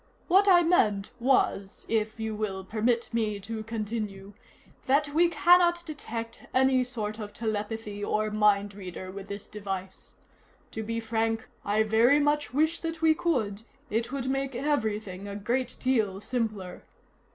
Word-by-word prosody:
"What 390 +3 +5
I 355 -3 +7
meant 210 - +2
was 230 -6 +1
if 220 0 -1
you 220 0 -2
will 200 -3 -3
permit 230 +4 0
me 215 -3 0
to 220 +3 -5
continue 215 -3 -4 0.5
that 285 +2 +3
we 340 +2 +4
cannot 345 +2 +4
detect 230 -7 -6
any 260 0 +4
sort 220 -3 -4
of 205 -1 -6
telepathy 210 -1 -3
or 215 +1 0
mind 205 -1 +3
reader 185 -1 -7
with 195 0 -8
this 200 0 -6
device. 195 -3 -6 0.6
To 220 - -4
be 230 +1 -3
frank, 225 0 -1 0.2
I 210 +2 +2
very 230 +6 +4
much 295 0 +1
wish 315 +5 +1
that 325 -1 -5
we 320 -1 +6
could; 230 - -1 0.3
it 230 +3 -1
would 270 -2 -3
make 270 0 -1
everything 215 -8 -1
a 200 - -6
great 240 +5 -2
deal 220 -7 +1
simpler. 215 -5 -3
225 Hz, 150 wpm, -28 LUFS, 205-265 Hz, 0.6 s, I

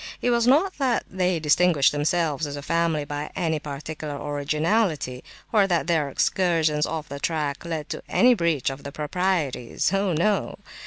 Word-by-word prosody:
It 245 - +1
was 235 0 +2
not 315 +9 +3
that 260 -4 +1
they 185 -2 0
distinguished 155 -1 +4
themselves 155 0 0
as 145 - -5
a 145 - -7
family 165 -1 0
by 145 +1 -5
any 160 -4 0
particular 150 0 -6
originality, 150 - -1 0.3
or 205 -3 +4
that 175 -3 +1
their 160 -4 +1
excursions 160 -1 +1
off 160 -2 -4
the 140 +1 -7
track 150 -3 -2
led 160 -3 -4
to - - -5
any 250 +1 +5
breach 165 - 0
of 135 +1 -8
the 140 - -7
proprieties. 150 -3 -1
Oh 195 -2 +1
no. 200 +6 0
160 Hz, 165 wpm, -24 LUFS, 145-185 Hz, 0.3 s, any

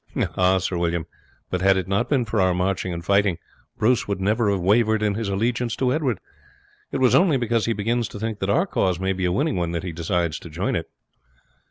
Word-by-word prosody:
"Ah! 95 +1 +3
Sir 90 -1 -2
William, 85 -1 -1 0.5
but 90 - -1
had 95 0 +4
it 95 -1 -2
not 100 +1 0
been 135 -5 +2
for 110 -1 0
our 95 -1 +2
marching 95 0 -1
and 85 0 -6
fighting 100 -2 +2 0.4
Bruce 125 +3 +2
would 100 -2 -2
never 105 +3 +1
have 100 -1 +1
wavered 110 +3 +2
in 105 -1 +1
his 110 0 -3
allegiance 115 +4 -1
to 130 -1 +1
Edward. 135 - -1 0.7
It - - -1
was 130 -2 +3
only 175 -6 +4
because 120 -2 0
he 115 - +2
begins 115 +3 -1
to 105 - -9
think 110 -1 -3
that 95 - -2
our 165 - +3
cause 95 - 0
may 95 +1 0
be 95 -1 -2
a 90 - +1
winning 145 - 0
one 85 -1 -1
that 85 - -3
he 90 - -4
decides 85 0 -1
to 85 - -11
join 75 - -2
it." - - -3
100 Hz, 230 wpm, -23 LUFS, 90-115 Hz, 0.7 s, had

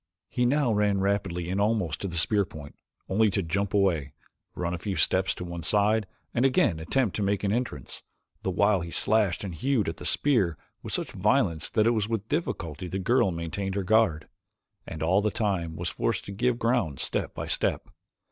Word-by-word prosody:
He 125 0 +1
now 140 -3 +2
ran 105 -1 +2
rapidly 95 -3 -1
in 95 +2 -1
almost 100 -7 0
to 100 - -2
the 85 -2 -4
spear's 100 +4 +3
point, 75 -2 -10 0.3
only 110 +3 +3
to 100 0 -1
jump 100 +4 -1
away, 85 -8 +1 0.4
run 85 0 -2
a 90 - -3
few 100 +2 -3
steps 95 0 +1
to 90 - -6
one 85 -1 -6
side 105 +4 +3 0.3
and 120 - +1
again 130 -11 +3
attempt 105 +6 0
to - - -2
make 100 0 0
an 100 - +1
entrance, 115 - -4 0.4
the - - -2
while 100 +1 +2
he 85 - -5
slashed 105 0 +2
and 95 -3 -5
hewed 120 - 0
at 80 - -3
the - - -9
spear 105 - +2 0.2
with - - -7
such - - -2
violence 80 -2 +1
that 110 -2 +2
it 115 - +4
was 110 -2 0
with 110 -2 -2
difficulty 90 - -3
the 95 - -3
girl 100 +2 +2
maintained 90 +3 -3
her 100 - -1
guard, 95 -7 +2 0.6
and 80 -1 -5
all 95 +5 +3
the 105 - +1
time 95 -7 -1
was - - -3
forced - - -2
to - - -7
give 120 +4 0
ground 115 - 0
step - - -3
by - - -4
step. - - -1
100 Hz, 205 wpm, -27 LUFS, 85-110 Hz, 0.6 s, it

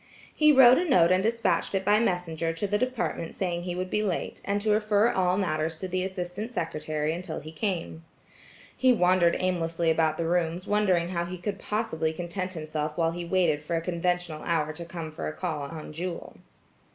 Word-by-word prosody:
He 305 -1 +5
wrote 260 -2 +8
a 355 -1 -1
note 175 -8 +5
and 185 0 +4
despatched 230 -1 0
it 190 - -1
by 210 +1 +5
messenger 170 -6 -1
to 165 +5 -2
the 205 +1 0
department 250 -9 -2
saying 175 -2 -1
he 175 -1 -3
would 185 +1 -4
be 210 - +1
late, 195 -5 -3
and 200 +1 0
to 215 0 +1
refer 210 +1 +3
all 180 -1 +1
matters 160 -4 -1
to 185 - -4
the 185 0 -1
assistant 190 +4 -4
secretary 155 -5 -2
until 175 -1 -5
he 155 +1 -9
came. 165 -2 -3 0.7
He 260 -1 +4
wandered 180 -4 +3
aimlessly 170 -2 0
about 160 -1 +1
the 170 - -1
rooms 175 +1 0
wondering 190 -5 +2
how 170 -2 -1
he 180 +1 -6
could 195 +3 -4
possibly 205 -9 -1
content 180 +2 -4
himself 155 -1 -3
while 165 -1 +2
he 175 +1 -5
waited 170 -4 +2
for 160 +3 -3
a - - +2
conventional 175 -2 -1
hour 155 -3 0
to 170 +2 -7
come 165 -2 -6
for 155 - -5
a - - -4
call 160 -5 -3
on 155 +1 -8
Jewel. 175 +2 -5
175 Hz, 200 wpm, -27 LUFS, 165-195 Hz, 0.7 s, wrote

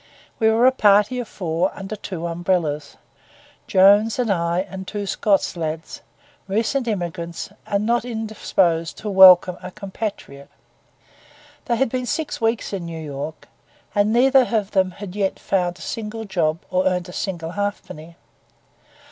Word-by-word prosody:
We 220 -1 +4
were 225 +2 +3
a 260 - +7
party 210 0 +3
of 240 - -4
four, 175 -1 -1
under 195 +2 -6
two 185 -4 -6
umbrellas; 165 -4 -1 0.7
Jones 205 +4 +5
and 245 -4 0
I 170 -1 0
and 190 0 -8
two 205 -1 -4
Scots 195 -2 +1
lads, 160 -1 -5 0.5
recent 230 +6 0
immigrants, 175 -4 -4 0.2
and 200 +1 0
not 235 +1 +1
indisposed 210 -8 -1
to 210 - -5
welcome 185 -2 +8
a - - -7
compatriot. 195 -8 -7 1.2
They 235 - +1
had 250 +1 +1
been 250 +1 -3
six 295 +2 -3
weeks 225 -2 0
in 190 -3 -3
New 165 -1 -6
York, 145 +2 -7 0.5
and 205 0 +2
neither 260 +2 +4
of 215 -3 0
them 190 -2 +2
had 190 0 -9
yet 195 -2 -1
found 180 -2 -1
a - - -14
single 225 0 -5
job 165 -5 0
or 185 +1 +2
earned 180 -1 -1
a 180 - -10
single 170 -4 -4
halfpenny. 180 -5 -5
195 Hz, 150 wpm, -22 LUFS, 175-220 Hz, 1.2 s, welcome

